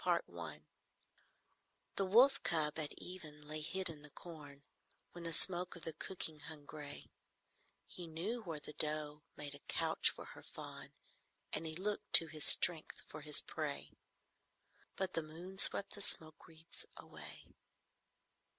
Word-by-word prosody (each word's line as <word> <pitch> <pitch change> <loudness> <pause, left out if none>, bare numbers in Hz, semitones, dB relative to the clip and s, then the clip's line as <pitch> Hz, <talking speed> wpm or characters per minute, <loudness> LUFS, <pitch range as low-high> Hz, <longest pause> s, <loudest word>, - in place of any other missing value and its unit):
CHAPTER - - -1 0.2
IV - - -20 1.3
The 195 - +1
wolf 255 +8 +5
cub 155 -2 0
at 150 -2 -2
even 155 -5 -9
lay 155 0 -4
hid 190 +5 -2
in 155 -3 -3
the 145 - -12
corn, 145 -3 -12 0.5
When 175 -1 -10
the 165 - -2
smoke 180 +2 +4
of 170 - -12
the 165 -2 -4
cooking 160 -2 -3
hung 155 -2 -5
gray: 145 -1 -9 0.7
He 175 -2 -9
knew 185 +10 -4
where 165 -7 -6
the 150 - -10
doe 150 -1 -2
made 145 -1 -6
a 145 - -11
couch - - +2
for - - -9
her - - -13
fawn, - - -10 0.6
And 160 +1 -1
he 160 - -5
looked 205 +4 -3
to 165 - +10
his 155 -1 -3
strength 165 -3 +4
for 155 - -9
his 150 -1 +4
prey. 150 -3 -5 1.0
But 190 -1 -3
the 165 - 0
moon 170 +5 -11
swept 200 - +9
the 205 - -8
smoke 155 -5 +1
wreaths 165 - -9
away. - - -10
160 Hz, 155 wpm, -36 LUFS, 150-180 Hz, 1.3 s, to